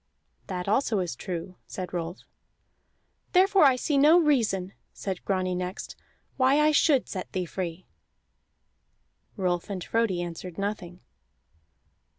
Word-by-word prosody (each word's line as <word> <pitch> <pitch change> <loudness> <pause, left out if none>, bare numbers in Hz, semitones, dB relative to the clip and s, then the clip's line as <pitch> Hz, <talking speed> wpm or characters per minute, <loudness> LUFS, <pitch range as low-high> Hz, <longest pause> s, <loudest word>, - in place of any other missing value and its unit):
"That 180 -1 -4
also 220 +1 +2
is 180 -8 -2
true," 180 +4 -6
said 185 -1 -6
Rolf. 175 +1 -4 1.1
"Therefore 380 -2 +5
I 265 -2 +6
see 280 +2 0
no 305 +5 +7
reason," 220 - +1 0.2
said 190 -3 -5
Grani 185 -2 0
next, 180 +1 -5 0.4
"why 265 +2 +4
I 305 +1 +5
should 295 -3 +3
set 185 -2 -6
thee 185 -1 -1
free." 175 0 -5 1.5
Rolf 180 -2 -1
and 190 -3 -4
Frodi 210 -6 0
answered 175 0 -7
nothing. 195 -3 -4
190 Hz, 125 wpm, -27 LUFS, 180-260 Hz, 1.5 s, no